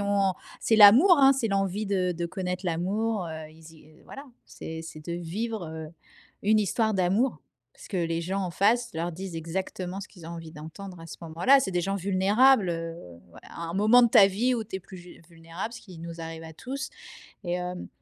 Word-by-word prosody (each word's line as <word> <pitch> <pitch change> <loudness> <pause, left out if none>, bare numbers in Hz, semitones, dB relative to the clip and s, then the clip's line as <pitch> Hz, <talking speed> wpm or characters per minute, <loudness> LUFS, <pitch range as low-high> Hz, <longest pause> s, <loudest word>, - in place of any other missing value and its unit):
ont 200 -1 +2 0.3
c'est 225 - +2
l'amour, 240 - +8
hein. 270 0 +7
C'est 255 -4 -1
l'envie 195 +1 -1
de 185 -2 0
de 170 0 -3
connaître 180 +1 -4
l'amour, 195 +4 -1
heu. 160 -1 -7
Ils 160 +1 -15
y 155 - -18
heu 155 0 -21
voilà. 275 - -10 0.2
C'est 160 0 -8
c'est 165 -1 -9
de 155 +3 -6
vivre, 180 +5 -4
heu, 160 -1 -7 0.5
une 215 +2 +4
histoire 220 +2 +1
d'amour. 190 - +1 0.3
Parce - - -14
que, 190 - -4
les 165 -1 -1
gens 190 +4 -2
en 180 - -3
face, 230 +7 +2
leur 170 +2 -3
disent 180 0 -7
exactement 180 +3 -4
ce 200 - -9
qu'ils 175 -5 -13
ont - - -7
envie 165 -1 -8
d'entendre 170 +5 -10
à 165 - -10
ce 145 - -8
moment-là. 170 +13 +4
C'est 195 - -2
des 180 - 0
gens 195 +3 -2
vulnérables, 200 +3 +3
heu, 165 0 -4 0.5
à 170 - -8
un 165 - -5
moment 215 +5 +6
de 235 - +5
ta 220 -4 +7
vie 220 +7 0
où 225 - -3
tu 210 - -11
es - - -7
plus 190 +1 -12
ju 175 -1 -14
vulnérable, 165 +6 -7
ce 235 - -9
qui 185 -5 -13
nous 170 0 -8
arrive 165 0 -7
à 160 0 -10
tous. 270 - -6 0.5
Et, 175 -1 -2
hem, 180 0 -4
185 Hz, 215 wpm, -27 LUFS, 165-210 Hz, 0.5 s, l'amour